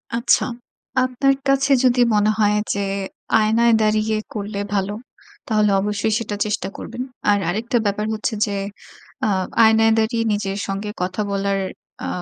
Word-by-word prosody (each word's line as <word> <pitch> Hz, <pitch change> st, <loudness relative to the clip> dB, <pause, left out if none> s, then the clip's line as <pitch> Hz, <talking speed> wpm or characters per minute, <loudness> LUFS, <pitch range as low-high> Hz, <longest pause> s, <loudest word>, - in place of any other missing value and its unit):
আচ্ছা। 235 Hz, +2 st, +3 dB, 0.6 s
আপনার 255 Hz, +2 st, +2 dB
কাছে 275 Hz, +1 st, +2 dB
যদি 250 Hz, -1 st, +4 dB
মনে 210 Hz, 0 st, +3 dB
হয়। 210 Hz, -1 st, +3 dB, 0.2 s
যে 200 Hz, -, -3 dB, 0.6 s
আয়নায় 225 Hz, +2 st, +3 dB
দাঁড়িয়ে 215 Hz, 0 st, +1 dB, 0.2 s
করলে 205 Hz, -1 st, -4 dB
ভালো, 200 Hz, 0 st, 0 dB, 0.5 s
তাহলে 215 Hz, -2 st, +2 dB
অবশ্যই 210 Hz, +1 st, -1 dB
সেটা 215 Hz, -2 st, -4 dB
চেষ্টা 210 Hz, -3 st, -2 dB
করবেন। 240 Hz, +3 st, -6 dB, 0.3 s
আর 205 Hz, -, +5 dB
আরেকটা 230 Hz, +6 st, 0 dB
ব্যাপার 205 Hz, +1 st, 0 dB
হচ্ছে 215 Hz, +1 st, -2 dB
যে 205 Hz, -2 st, -3 dB, 0.7 s
আ -, -, +2 dB, 0.3 s
আয়নায় 225 Hz, 0 st, +5 dB
দাঁড়িয়ে 230 Hz, +1 st, +1 dB
নিজের 200 Hz, -1 st, -2 dB
সঙ্গে 195 Hz, +2 st, -3 dB
কথা 185 Hz, +4 st, -2 dB
বলার 195 Hz, 0 st, 0 dB, 0.5 s
আ -, -, -3 dB
215 Hz, 140 wpm, -21 LUFS, 205-230 Hz, 0.7 s, আর